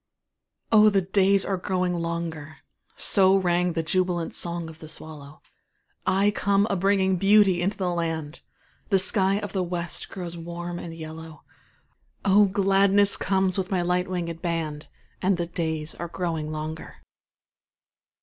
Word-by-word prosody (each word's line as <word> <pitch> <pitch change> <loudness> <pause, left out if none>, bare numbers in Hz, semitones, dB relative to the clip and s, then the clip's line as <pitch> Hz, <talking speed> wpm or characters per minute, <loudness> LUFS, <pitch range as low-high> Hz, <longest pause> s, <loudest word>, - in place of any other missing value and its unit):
Oh, 215 -1 +7
the 195 -2 +1
days 195 +1 +2
are 195 - -1
growing 185 -1 -1
longer; 165 -2 -4 0.4
So 190 -1 +4
rang 180 -1 +1
the 165 - -1
jubilant 175 0 -1
song 170 -1 -2
of 160 0 -12
the 155 - -10
swallow; 155 -2 -9 0.6
I 195 +2 +3
come 200 0 +2
a - - +1
bringing 190 0 +2
beauty 195 -2 +4
into 195 +4 -1
the 185 -2 -1
land, 165 -3 -3 0.5
The 195 - +4
sky 190 +1 +3
of 205 -1 -5
the 190 - 0
West 175 -1 -4
grows 175 -3 -7
warm 175 +1 -6
and 165 -1 -8
yellow, 160 0 -9 0.8
Oh, 205 +1 +6
gladness 195 +1 +3
comes 190 0 0
with 185 0 -3
my 185 -4 0
light 180 +1 0
winged 170 -3 -4
band, 160 -3 -3 0.3
And 190 0 +2
the 175 - -1
days 160 -2 -3
are 170 - -6
growing 165 -3 -3
longer. 155 +1 -6
180 Hz, 150 wpm, -25 LUFS, 165-195 Hz, 0.8 s, Oh